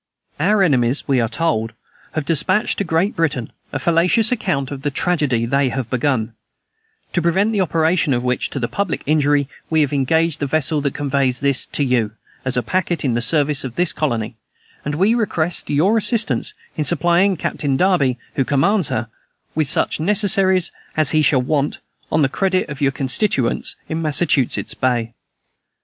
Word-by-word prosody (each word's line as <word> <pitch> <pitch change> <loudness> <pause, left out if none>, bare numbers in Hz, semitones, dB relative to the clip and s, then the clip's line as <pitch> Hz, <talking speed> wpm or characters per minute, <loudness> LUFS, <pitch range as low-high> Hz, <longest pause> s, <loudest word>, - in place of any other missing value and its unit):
"Our 200 +5 +3
enemies, 130 -5 +1
we 135 -3 +2
are 115 - -1
told, 115 -9 -1 0.4
have 155 -2 -2
despatched 170 +6 +1
to - - +1
Great 170 +3 0
Britain 140 -8 -1 0.2
a - - -2
fallacious 170 - +2
account 140 - -1
of 140 -2 -6
the 145 - -1
tragedy 140 -6 0
they 135 +2 +1
have 125 -2 -4
begun; 125 -3 0 0.8
to 175 - +1
prevent 190 +6 +2
the 205 -3 +1
operation 160 -2 +1
of 120 -1 0
which 125 0 0
to 140 - -4
the 120 - -1
public 200 +3 -3
injury, 145 -1 +2 0.2
we 160 -1 +2
have 145 -1 0
engaged 160 +3 +1
the 145 - -1
vessel 155 +1 0
that 140 -1 -2
conveys 140 -3 0
this 140 -2 0
to 145 - -1
you, 120 -5 0 0.3
as 130 -1 0
a 125 - +1
packet 175 +2 -1
in 125 - +1
the 120 - 0
service 145 +2 +1
of 125 -3 -6
this 180 -1 +1
colony, 120 -6 -2 0.5
and 145 0 -3
we 195 +8 +3
request 180 -8 -1
your 170 +10 +2
assistance 230 0 0 0.2
in 155 - -1
supplying 175 +5 +2
Captain 140 -3 -1
Derby, 150 -9 +2 0.2
who 135 - +3
commands 155 - +2
her, 110 +1 -2 0.5
with 155 -2 0
such 165 0 0
necessaries 190 0 +3 0.3
as 155 -3 +4
he 155 - +3
shall 135 -3 +3
want, 145 +1 -1 0.3
on 155 -1 +2
the - - +4
credit 185 +6 0
of 150 -1 -7
your 140 -1 +3
constituents 135 - -1
in 160 +1 -3
Massachusetts 150 -4 +1
Bay. 120 -3 -1
150 Hz, 175 wpm, -19 LUFS, 130-175 Hz, 0.8 s, as